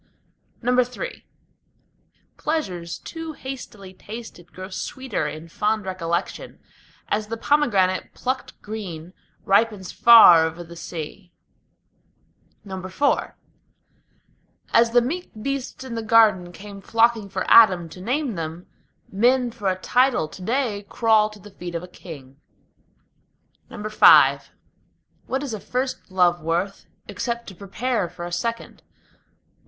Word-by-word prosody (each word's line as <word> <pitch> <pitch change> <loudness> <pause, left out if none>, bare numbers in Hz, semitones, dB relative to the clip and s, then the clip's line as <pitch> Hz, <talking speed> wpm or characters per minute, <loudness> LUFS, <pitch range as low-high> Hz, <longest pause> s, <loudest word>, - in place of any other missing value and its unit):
III 250 - -1 1.1
Pleasures 185 - -3
too 325 -1 -7
hastily 230 -9 -9
tasted 210 -3 -10
grow 185 0 -8
sweeter 240 - -4
in 155 +2 -7
fond 210 +4 -1
recollection, 175 -1 -3 0.5
As 210 0 -1
the 230 +1 -4
pomegranate 205 -10 +1
plucked 260 +1 -4
green 185 -6 -7 0.3
ripens 200 -1 +1
far 220 -9 +8
over 165 +2 -3
the 170 0 -12
sea. 170 +2 -8 1.3
IV 190 +8 -1 1.4
As 230 0 +5
the 240 +1 +4
meek 345 +9 -4
beasts 275 +2 -4
in 260 -2 -7
the 230 - -3
Garden 215 -5 +4
came 200 +1 -11
flocking 225 -1 +2
for - - -3
Adam 185 -7 +6
to 180 - -11
name 255 +5 -1
them, 165 0 -6 0.5
Men 245 +4 +2
for 220 -4 -5
a 185 0 0
title 250 -5 +2
to 185 - -12
day 225 -1 -1
crawl 220 -2 +3
to 210 - -13
the 205 +1 -14
feet 175 -2 -8
of 170 - -3
a - - -8
king. 145 -6 -12 1.3
V - - -11 1.5
What 265 +2 -2
is 270 -5 -4
a 215 - -4
first 255 +3 -4
love 180 -2 +2
worth, 170 +5 -2 0.2
except 235 -1 -4
to 190 - -12
prepare 205 +1 -2
for 175 0 -8
a 175 - -7
second? 230 +7 -4
205 Hz, 125 wpm, -23 LUFS, 180-240 Hz, 1.5 s, far